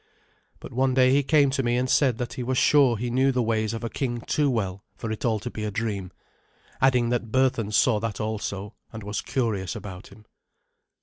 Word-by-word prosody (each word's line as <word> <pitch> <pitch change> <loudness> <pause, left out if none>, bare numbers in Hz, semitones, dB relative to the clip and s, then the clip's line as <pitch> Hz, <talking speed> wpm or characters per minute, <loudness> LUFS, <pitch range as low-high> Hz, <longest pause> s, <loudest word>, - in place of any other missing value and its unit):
But - - -10
one 130 +1 +1
day 130 -1 +5
he 140 +2 +4
came 145 -1 +3
to 135 - 0
me 120 -1 +1
and 125 +1 0
said 130 -3 +3
that 120 0 -4
he - - -5
was 130 +1 -1
sure 135 -5 +4
he 120 +2 -3
knew 130 +2 +3
the 125 -2 0
ways 110 -1 0
of 115 0 -5
a 115 - -2
king 120 -3 -2
too 145 +5 +1
well 100 -6 -2
for 110 +3 -5
it 110 - -5
all 115 -3 +2
to 120 +4 -6
be 105 - -5
a 105 - -1
dream, 100 -4 -3 0.7
adding 125 -3 +3
that 120 -2 -2
Berthun 125 -5 +1
saw 105 +1 +3
that 110 -2 -4
also, 105 -1 -4 0.2
and 110 -1 -8
was 105 +1 -3
curious 110 -5 -2
about 95 -3 -8
him. 105 +2 -17
115 Hz, 220 wpm, -25 LUFS, 105-130 Hz, 0.7 s, day